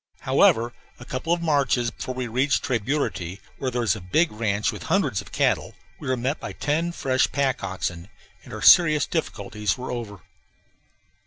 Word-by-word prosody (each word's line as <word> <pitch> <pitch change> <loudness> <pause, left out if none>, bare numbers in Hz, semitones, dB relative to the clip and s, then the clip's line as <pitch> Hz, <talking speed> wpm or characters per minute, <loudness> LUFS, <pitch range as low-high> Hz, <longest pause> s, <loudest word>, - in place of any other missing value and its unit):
However, 120 +2 +3 0.3
a 120 - -10
couple 130 +8 -3
of 170 0 +1
marches 140 -6 +2
before 130 - -6
we 130 0 -2
reached 130 +5 +1
Tres 125 -3 0
Burity, 100 - -2 0.2
where 130 - -1
there 120 -1 -1
is 110 -4 +2
a 105 - -8
big 155 - +2
ranch 105 -1 0
with - - -8
hundreds - - +1
of - - -15
cattle, - - 0 0.2
we - - -8
were 130 0 +1
met 130 +5 -1
by - - -6
ten 160 +4 -1
fresh 130 -6 +1
pack 140 -2 0
oxen, 90 -2 -4 0.4
and - - -13
our - - -6
serious 155 -4 +7
difficulties 105 - -2
were 130 +1 -5
over. 110 -6 -6
125 Hz, 180 wpm, -24 LUFS, 105-145 Hz, 0.4 s, serious